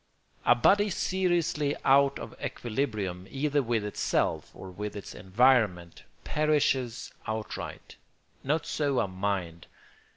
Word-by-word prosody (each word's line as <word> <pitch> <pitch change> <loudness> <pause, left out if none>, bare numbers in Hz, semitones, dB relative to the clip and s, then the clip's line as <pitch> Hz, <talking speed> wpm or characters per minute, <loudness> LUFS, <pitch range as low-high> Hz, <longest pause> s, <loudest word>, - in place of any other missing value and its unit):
A 120 - +7
body 205 - +4
seriously 175 -6 0
out 140 +1 +5
of - - -8
equilibrium, 105 -7 -3
either 145 +1 0
with 115 -4 -1
itself 105 - 0
or 95 - -9
with 105 +3 -5
its 100 - -7
environment, 95 -4 +2 0.2
perishes 140 -5 0
outright. 110 -1 -5 0.5
Not 155 +4 0
so 145 -5 0
a - - +1
mind. 95 -3 -3
120 Hz, 110 wpm, -28 LUFS, 100-145 Hz, 0.5 s, A